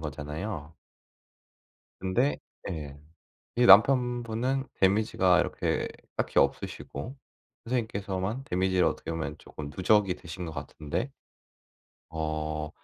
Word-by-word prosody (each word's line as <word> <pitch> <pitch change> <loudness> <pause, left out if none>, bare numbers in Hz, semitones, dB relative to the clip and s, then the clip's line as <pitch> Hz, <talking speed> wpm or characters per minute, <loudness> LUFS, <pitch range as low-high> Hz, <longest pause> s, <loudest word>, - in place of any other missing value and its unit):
거잖아요? 75 +2 -5 1.3
근데 110 +10 +1 0.3
예. 75 -5 -6 0.6
이 120 0 +5
남편분은 125 +2 +5
데미지가 95 -2 +4
이렇게 - - -1 0.3
딱히 - - 0
없으시고 125 - -1 0.5
선생님께서만 110 -1 -2
데미지를 95 -3 +2
어떻게 - - -2
보면 80 -2 -3
쪼끔 75 -1 -8
누적이 95 0 +3
되신 85 +2 -7
것 80 - -6
같은데 80 - -4 1.0
어 75 -1 -2
95 Hz, 245 characters per minute, -29 LUFS, 80-115 Hz, 1.3 s, 이